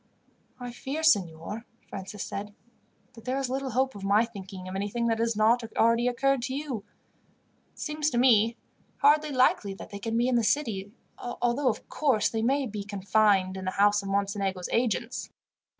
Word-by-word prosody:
"I 245 Hz, -1 st, -6 dB
fear, 275 Hz, +6 st, -5 dB
signor," 200 Hz, -, +1 dB, 0.2 s
Francis 195 Hz, +1 st, -6 dB
said, 205 Hz, +1 st, -6 dB, 0.6 s
"that 230 Hz, -1 st, -14 dB
there 255 Hz, +1 st, -1 dB
is 270 Hz, -2 st, -2 dB
little 270 Hz, 0 st, -2 dB
hope 260 Hz, +2 st, +1 dB
of 200 Hz, -, -9 dB
my 205 Hz, +3 st, +4 dB
thinking 190 Hz, -4 st, -9 dB
of 185 Hz, -, -6 dB
anything 205 Hz, +4 st, -2 dB
that 225 Hz, 0 st, 0 dB
has 230 Hz, -1 st, +1 dB
not 225 Hz, +3 st, +3 dB
already 230 Hz, +2 st, +4 dB
occurred 275 Hz, +2 st, +1 dB
to 260 Hz, +2 st, -3 dB
you. 275 Hz, -8 st, -4 dB, 0.9 s
It -, -, -36 dB
seems 300 Hz, 0 st, -1 dB
to 240 Hz, -, -2 dB
me 230 Hz, -2 st, +4 dB, 0.4 s
hardly 300 Hz, +2 st, +4 dB
likely 255 Hz, -7 st, +2 dB
that -, -, -11 dB
they 200 Hz, -, -6 dB
can 225 Hz, +2 st, -2 dB
be 240 Hz, +1 st, +2 dB
in 255 Hz, -1 st, +2 dB
the 235 Hz, -, +2 dB
city, 210 Hz, -6 st, 0 dB, 0.3 s
although, 245 Hz, +2 st, 0 dB
of 220 Hz, -, -4 dB
course, 265 Hz, -9 st, +1 dB
they 225 Hz, -, -2 dB
may 270 Hz, +4 st, +1 dB
be 210 Hz, -3 st, -5 dB
confined 200 Hz, -1 st, +2 dB
in 190 Hz, 0 st, -6 dB
the -, -, 0 dB
house 205 Hz, +2 st, +3 dB
of 195 Hz, -, -6 dB
Mocenigo's 195 Hz, -2 st, -1 dB
agents. 235 Hz, -2 st, -1 dB
225 Hz, 180 wpm, -28 LUFS, 200-255 Hz, 0.9 s, my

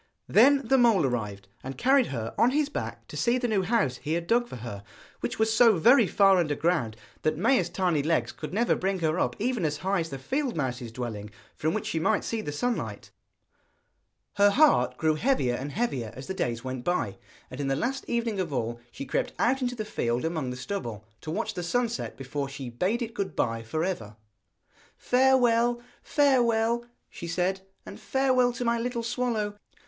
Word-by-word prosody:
Then 275 Hz, +5 st, +5 dB
the 265 Hz, 0 st, +4 dB
mole 230 Hz, -, +4 dB
arrived, 105 Hz, -6 st, -3 dB, 0.2 s
and 135 Hz, +1 st, -6 dB
carried 265 Hz, 0 st, +4 dB
her 115 Hz, -4 st, -4 dB
on 235 Hz, -, +4 dB
his 290 Hz, +2 st, +1 dB
back -, -, -5 dB
to -, -, -10 dB
see 240 Hz, +1 st, +2 dB
the 250 Hz, -1 st, -1 dB
new 210 Hz, -4 st, +1 dB
house 190 Hz, -, +1 dB
he 155 Hz, -, -3 dB
had 170 Hz, 0 st, -1 dB
dug 240 Hz, +6 st, +2 dB
for -, -, -8 dB
her, 110 Hz, -4 st, -7 dB, 0.4 s
which -, -, -3 dB
was 220 Hz, 0 st, +2 dB
so 225 Hz, -4 st, +6 dB
very 235 Hz, -, +6 dB
far 195 Hz, -1 st, +5 dB
under 155 Hz, -5 st, +1 dB
ground 140 Hz, -10 st, 0 dB, 0.2 s
that 155 Hz, -, 0 dB
Maia's 190 Hz, -2 st, +2 dB
tiny 175 Hz, -4 st, +1 dB
legs 160 Hz, +3 st, 0 dB
could 155 Hz, -, -8 dB
never 230 Hz, +6 st, +2 dB
bring 195 Hz, +1 st, -1 dB
her 160 Hz, +2 st, +1 dB
up -, -, 0 dB
even 235 Hz, -2 st, -1 dB
as 150 Hz, -2 st, 0 dB
high 195 Hz, 0 st, +2 dB
as 165 Hz, -1 st, -3 dB
the 135 Hz, -, -5 dB
field 260 Hz, -, -2 dB
mouse's 125 Hz, -5 st, -3 dB
dwelling, 110 Hz, -4 st, -5 dB, 0.3 s
from 155 Hz, +2 st, -1 dB
which -, -, -3 dB
she 160 Hz, -, -1 dB
might 210 Hz, +6 st, +1 dB
see 225 Hz, -1 st, -2 dB
the 150 Hz, -, -5 dB
sunlight. 240 Hz, +11 st, -3 dB, 1.3 s
Her 205 Hz, 0 st, +6 dB
heart 200 Hz, -, +4 dB
grew 160 Hz, -1 st, +2 dB
heavier 155 Hz, -, +1 dB
and 135 Hz, +4 st, -4 dB
heavier 135 Hz, -, -2 dB
as 130 Hz, -, -8 dB
the 190 Hz, -, -4 dB
days 120 Hz, -9 st, -2 dB
went 130 Hz, -1 st, -5 dB
by, 175 Hz, -, -1 dB, 0.3 s
and 130 Hz, +2 st, -5 dB
in 140 Hz, -, -2 dB
the 135 Hz, -, +1 dB
last 260 Hz, -, -2 dB
evening 235 Hz, -4 st, -1 dB
of 175 Hz, -4 st, -2 dB
all 120 Hz, -3 st, -2 dB
she 140 Hz, -, -7 dB
crept -, -, -1 dB
out 265 Hz, +3 st, +2 dB
into 245 Hz, -1 st, -1 dB
the 215 Hz, -2 st, -4 dB
field 120 Hz, -, -1 dB
among 160 Hz, -5 st, -2 dB
the 125 Hz, -, -5 dB
stubble, 120 Hz, -, -5 dB, 0.2 s
to -, -, -7 dB
watch 160 Hz, -, -2 dB
the 180 Hz, -, -4 dB
sun 240 Hz, +8 st, +1 dB
set 230 Hz, -, -5 dB
before 135 Hz, +1 st, -4 dB
she 135 Hz, -3 st, -7 dB
bade 195 Hz, -, 0 dB
it 230 Hz, 0 st, -6 dB
good 200 Hz, -4 st, -3 dB
bye 115 Hz, -1 st, 0 dB
for 155 Hz, +8 st, -3 dB
ever. 115 Hz, -, -3 dB, 0.8 s
'Farewell, 245 Hz, -2 st, +3 dB, 0.2 s
farewell,' 235 Hz, -4 st, +2 dB, 0.2 s
she 170 Hz, -, -8 dB
said 185 Hz, +3 st, -1 dB, 0.2 s
'and -, -, -9 dB
farewell 260 Hz, -2 st, +2 dB
to 240 Hz, +1 st, -4 dB
my 235 Hz, 0 st, +1 dB
little 240 Hz, 0 st, -2 dB
swallow. 230 Hz, -3 st, -1 dB
185 Hz, 205 wpm, -27 LUFS, -, 1.3 s, so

